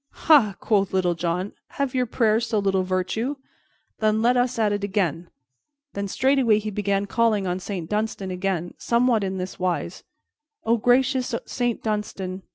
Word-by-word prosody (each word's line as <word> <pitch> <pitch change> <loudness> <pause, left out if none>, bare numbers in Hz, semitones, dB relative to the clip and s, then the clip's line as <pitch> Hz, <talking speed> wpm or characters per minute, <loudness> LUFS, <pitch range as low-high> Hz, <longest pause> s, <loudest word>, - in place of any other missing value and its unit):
"Ha!" 255 - +6
quoth 200 -3 +1
Little 180 -2 +2
John, 175 +3 -2 0.3
"have 280 -2 -1
your 250 -1 +1
prayers 225 0 +1
so 220 - 0
little 195 -2 +1
virtue? 185 +8 -1 0.6
Then 215 0 +2
let 245 +2 +4
us 245 -1 +1
at 215 -2 +2
it 205 0 -3
again." 180 -5 -1 0.6
Then 200 0 -3
straightway 260 0 +3
he 215 0 -3
began 200 0 0
calling 215 -1 +1
on 180 0 -1
Saint 185 -3 -5
Dunstan 210 -1 -2
again, 180 -2 -2
somewhat 235 -2 +2
in 190 0 -2
this 185 +1 -6
wise: 180 -1 -2 0.6
"O 230 +1 +3
gracious 250 +1 +2
Saint 240 -2 -2
Dunstan! 200 -3 -3
210 Hz, 160 wpm, -24 LUFS, 190-235 Hz, 0.6 s, Ha